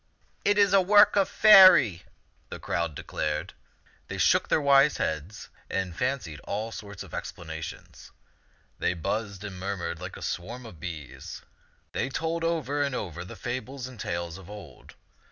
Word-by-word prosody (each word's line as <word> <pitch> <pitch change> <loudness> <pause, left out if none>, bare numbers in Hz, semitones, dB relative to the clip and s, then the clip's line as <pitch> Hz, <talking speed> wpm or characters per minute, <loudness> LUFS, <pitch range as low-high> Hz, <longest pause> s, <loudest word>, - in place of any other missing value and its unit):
" - - -39
It 205 0 +3
is 200 -2 +4
a 195 - +6
work 205 +2 +6
of 200 -2 +3
Faerie," 185 - +7 0.5
the - - -6
crowd 85 -3 -2
declared. 75 +5 -3 0.5
They - - -6
shook - - +3
their - - +3
wise 140 0 +4
heads 80 +8 -4 0.2
and 95 -3 -2
fancied 125 - -2
all 110 +7 -4
sorts 100 -3 -8
of - - -14
expla 85 - -6
nations. 80 0 -8 0.7
They 90 - 0
buzzed 100 +3 -3
and 95 -3 -7
murmured 90 -3 -4
like 90 +1 -7
a - - -9
swarm 120 +8 -5
of 100 -8 -12
bees. 80 -7 -8 0.5
They - - -2
told 165 +4 -2
over 150 -4 -1
and 140 -2 0
over 85 -6 -5
the 90 - -10
fables 130 +1 -5
and 125 -3 -10
tales 85 -1 -4
of 95 0 -14
old. 100 -11 -12
105 Hz, 165 wpm, -27 LUFS, 85-140 Hz, 0.7 s, Faerie